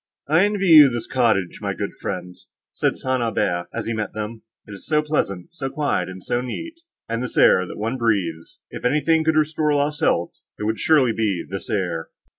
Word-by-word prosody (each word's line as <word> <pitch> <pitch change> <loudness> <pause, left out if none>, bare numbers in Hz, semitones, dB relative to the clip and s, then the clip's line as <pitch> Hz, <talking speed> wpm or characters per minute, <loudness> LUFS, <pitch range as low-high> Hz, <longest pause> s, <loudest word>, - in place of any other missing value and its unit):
"I 160 +6 +4
envy 205 -1 -1
you 155 -5 +9
this 120 -2 -4
cottage, 110 -8 +1
my - - -2
good - - -3
friends," 90 0 -6 0.2
said - - 0
St. 130 -1 -1
Aubert, 90 -6 -1
as - - -4
he 115 - -2
met 110 -1 -3
them, 110 +1 -5 0.3
"it - - -11
is 100 - -11
so 150 -1 +2
pleasant, 100 - -2
so 135 -5 -4
quiet, 145 -8 -1
and 95 0 -9
so 120 - -1
neat; 330 - -6 0.3
and 115 +1 -2
this 125 - -5
air, 90 0 +5
that - - -8
one 115 +5 -2
breathes—if 95 -9 -3
anything 150 +5 +2
could 160 0 +2
restore 155 -1 +1
lost 145 +1 0
health, 85 - 0 0.2
it - - -6
would 110 +1 -1
surely 140 -7 +3
be 105 -6 -1
this 95 +1 -6
air." 90 -6 -2
120 Hz, 200 wpm, -22 LUFS, 100-150 Hz, 0.3 s, you